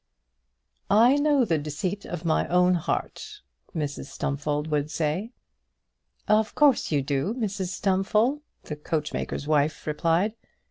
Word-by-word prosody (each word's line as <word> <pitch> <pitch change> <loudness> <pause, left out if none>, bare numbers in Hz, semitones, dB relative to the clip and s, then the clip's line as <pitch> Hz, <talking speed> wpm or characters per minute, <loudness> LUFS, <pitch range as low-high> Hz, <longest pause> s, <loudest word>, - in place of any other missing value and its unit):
"I 230 +5 +6
know 290 -3 +3
the 165 -7 +1
deceit 165 +7 -4
of 175 -1 -6
my 160 - +1
own 180 +1 +4
heart," 415 - -3 0.3
Mrs 145 -3 -3
Stumfold 145 +2 -2
would 150 0 0
say. 160 +7 -2 1.0
"Of 215 0 +2
course 285 - +3
you 145 -3 +1
do, 140 - -1
Mrs 205 -6 -2
Stumfold," 210 +9 +1 0.2
the 150 - -6
coachmaker's 150 -2 -3
wife 150 0 +1
replied. 165 +7 +1
175 Hz, 125 wpm, -26 LUFS, 150-215 Hz, 1.0 s, I